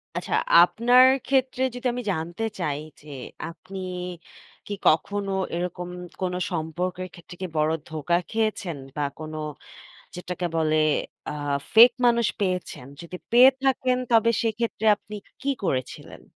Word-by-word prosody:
আচ্ছা, - - -3 0.3
আপনার 245 +7 +5 0.2
ক্ষেত্রে 260 -1 +1
যদি 250 +1 -2
আমি 245 - -3
জানতে 170 +5 -4 0.2
চাই 150 -5 -1 0.2
যে, 150 - -17 0.4
আপনি 180 +4 -11 0.9
কি 205 - -4
কখনো 200 +5 +2 0.2
এরকম 180 0 -4 0.3
কোন 180 -1 -1 0.2
সম্পর্কের 180 +3 -3
ক্ষেত্রে 175 +1 -12
কি 185 - -2
বড় 155 +1 +2 0.2
ধোকা 160 +2 0
খেয়েছেন 215 -7 -1 0.2
বা - - 0 0.2
কোন, 155 0 -7 0.8
যেটাকে 180 0 -4
বলে, 155 -1 +2 0.5
আ - - -3 0.4
ফেক 235 +3 +9
মানুষ 235 -2 +4
পেয়েছেন? 185 -9 -2 0.2
যদি 170 +1 -8 0.2
পেয়ে 250 +3 +9
থাকেন, 260 -1 +2
তবে 230 0 +5
সেক্ষেত্রে 225 0 -2
আপনি 210 +1 -11 0.3
কী 280 - -1
করেছিলেন? 130 -8 -3
185 Hz, 130 wpm, -25 LUFS, 165-230 Hz, 0.9 s, ফেক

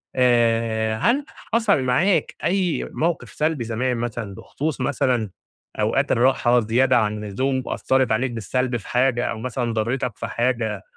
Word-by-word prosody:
آآ 115 -3 +2
هل 265 - +1 0.3
حصل 220 - +3
معاك 165 +10 +1
أي 185 -2 0
موقف 165 +1 -1
سلبي 155 -5 -1
زمان 120 +2 -1
مثلًا 115 -4 -4
بخصوص 145 +4 -4
مثلًا 125 -5 0 0.5
أوقات - - +1
الراحة 120 0 +3
زيادة 125 +3 +3
عن 105 -1 0
اللزوم 130 +6 -1
وأثرت 130 -3 +1
عليك 125 +3 +1
بالسلب 120 +3 -1
في 105 - -12
حاجة 125 -1 +2
أو 110 - -3
مثلًا 120 -1 -2
ضرتك 115 +1 -2
في 115 - -4
حاجة 115 -3 -1
125 Hz, 140 wpm, -22 LUFS, 115-130 Hz, 0.5 s, حصل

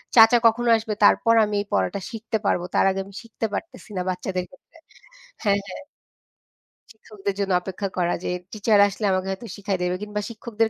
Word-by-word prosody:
চাচা 225 +1 +8
কখনো 235 +1 +4
আসবে 220 -1 -4
তারপর 230 +2 +5
আমি 210 -1 -1
এই - - -7
পড়াটা 95 - +1
শিখতে 225 -1 -3
পারবো 180 - +1
তার - - +4
আগে 195 0 -1
আমি 200 - -14
শিখতে 225 0 -5
পারতেছি 255 -1 -6
না - - 0
বাচ্চাদের 185 0 -2
ক্ষেত্রে 275 +4 -21 0.7
হ্যাঁ, 200 -2 +3
হ্যাঁ। 195 - -8 1.1
শিক্ষকদের 210 -3 -6
জন্য 200 -1 -1
অপেক্ষা 190 +2 -4
করা 175 -1 +1
যে - - -2 0.2
টিচার 215 0 +2
আসলে 200 +2 -4
আমাকে 185 0 0
হয়তো 195 +5 -6
শিখায় 195 -2 -2
দেবে। 180 0 0
কিংবা 210 0 -3
শিক্ষকদের 225 -1 -1
210 Hz, 180 wpm, -24 LUFS, 190-225 Hz, 1.1 s, চাচা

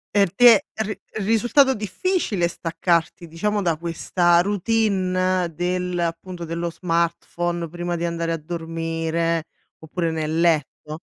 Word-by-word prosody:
Per 200 -4 +3
te 235 -1 +7 0.2
ri 215 0 -3 0.2
risultato 240 +6 +3
difficile 210 - -1
staccarti 170 0 -1
diciamo 205 +6 -1
da 170 -4 0
questa 170 +1 +2
routine 185 -3 +1
del 180 +1 -2
appunto 170 +1 -3
dello 170 +1 -3
smartphone 170 0 -1
prima 175 +1 -3
di 170 0 -2
andare 170 0 -2
a 165 - 0
dormire, 165 0 -2 0.3
oppure 165 +1 -3
nel 160 0 -2
letto? 155 -1 0
175 Hz, 120 wpm, -22 LUFS, 165-185 Hz, 0.3 s, te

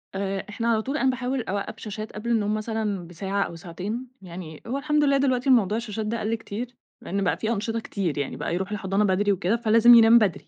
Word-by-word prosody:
آآ، 195 0 -2
إحنا 230 +2 -3
على 225 -2 +2
طول 275 +6 -3
أنا 265 - +2
باحاول 255 +1 -1
أوقّف 205 +3 -4
شاشات 215 0 -6
قبل 215 +3 -5
النوم 215 -3 +1
مثلًا 215 -4 -2
بساعة 195 +4 -2
أو 170 - -6
ساعتين. 190 +9 -5
يعني 170 -4 -9
هو 255 +4 -2
الحمد 300 +2 +1
لله 280 -1 +4
دلوقتي 265 -1 +1
الموضوع 220 -5 +4
الشاشات 220 -2 -4
ده 230 +2 -2
قَل 220 +2 -1
كتير، 230 +2 -6 0.3
لإن 195 +2 -2
بقى 180 - +1
في 220 - -2
أنشطة 225 +1 -1
كتير، 195 -8 -3
يعني 145 - -3
بقى - - -3
يروح 190 +3 -3
الحضانة 195 0 0
بدري 205 +1 +2
وكده، 195 +2 +1
فلازم 230 +1 +6
ينام 230 0 +8
بدري. 205 -7 +1
215 Hz, 220 wpm, -25 LUFS, 195-235 Hz, 0.3 s, ينام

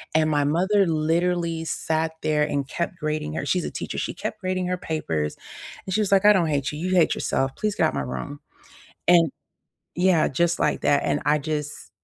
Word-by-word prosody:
And 155 0 +3
my 145 -1 +2
mother 190 +7 +2
literally 165 +1 0
sat 160 0 -1
there 150 -1 +2
and 140 -2 -1
kept 170 +4 -3
grading 155 0 -2
her- - - -3
she's 180 +4 0
a - - -4
teacher- - - -5
she - - -3
kept - - -5
grading 185 -1 -1
her 180 - 0
papers, 80 - -3 0.5
and 190 - -4
she 215 - +2
was 200 -2 -1
like, 195 0 +4
"I 210 - +8
don't 175 -5 +2
hate 140 -3 -1
you, 150 - -7
you 185 +3 -1
hate 170 -3 +4
yourself, 135 0 -1
please 210 -1 -1
get - - +2
out - - -4
my 70 - -1
room." 65 - -5 0.7
And 170 -4 +5 0.7
yeah, 175 -3 +3
just 170 +5 +1
like - - +1
that, 145 - +3
and 145 - 0
I 150 +1 +4
just 150 0 -5
160 Hz, 210 wpm, -24 LUFS, 150-180 Hz, 0.7 s, I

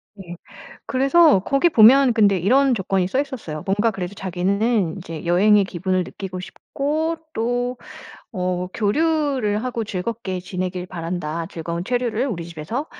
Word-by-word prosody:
네. 175 -4 -9 0.5
그래서 275 - +4
거기 275 - +2
보면 250 +1 +6
근데 205 -3 +4
이런 260 +9 +3
조건이 190 -2 0
써 230 +8 -1
있었어요. 240 - -5
뭔가 205 +4 +1
그래도 195 -1 -6
자기는 195 +1 0
이제 165 -4 -8
'여행의 200 +4 +4
기분을 185 0 -1
느끼고 185 0 -7
싶고 305 - -3 0.2
또 245 +2 -1 0.6
어 180 0 -2
교류를 260 -2 0
하고 240 -2 -2
즐겁게 195 -1 -4
지내길 180 0 -4
바란다. 165 -2 -4
즐거운 170 0 -5
체류를 245 +1 -1
우리 180 -10 -4
집에서. 170 - -5
200 Hz, 315 characters per minute, -21 LUFS, 180-245 Hz, 0.6 s, 보면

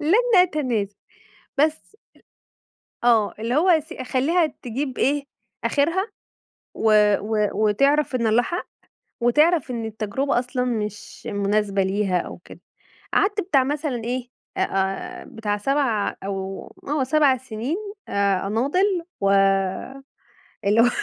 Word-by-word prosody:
لن 440 +10 +3
أتنازل، 255 - +2 0.7
بس، 315 +7 0 1.1
آه 225 -4 +4
اللي 230 +3 -2
هو 345 +5 +3
أس 320 -1 +3
أخليها 295 +5 +1 0.2
تجيب 255 +2 -4
إيه، 285 +1 +1 0.4
آخرها 335 +8 +1 0.7
و 220 -1 +3 0.3
و 210 0 0
وتعرف 275 +8 +2
إن 235 -2 +1
الله 220 +2 +4
حق، 350 +6 -4 0.5
وتعرف 300 +4 +3
إن 230 -2 -3
التجربة 220 +5 -1
أصلًا 250 +1 -2
مش 210 -3 -4
مناسبة 200 -1 +1
ليها 190 -2 0
أو - - -6
كده، - - -14 0.5
قعدت 410 +1 +2
بتاع 300 -8 +3
مثلًا 280 -3 -2
إيه 250 +1 -3 0.3
آآ، 195 0 -2
بتاع 210 -2 -3
7 235 -2 0
أو 195 -1 -4 0.3
آه 290 -1 +1
7 275 0 +3
سنين 250 - -4 0.3
آآ، 200 -1 +1
أناضل، 335 - +1 0.2
و 195 - +3 1.4
اللي 210 +3 +5
هو 245 - +5
250 Hz, 120 wpm, -23 LUFS, 210-300 Hz, 1.4 s, اللي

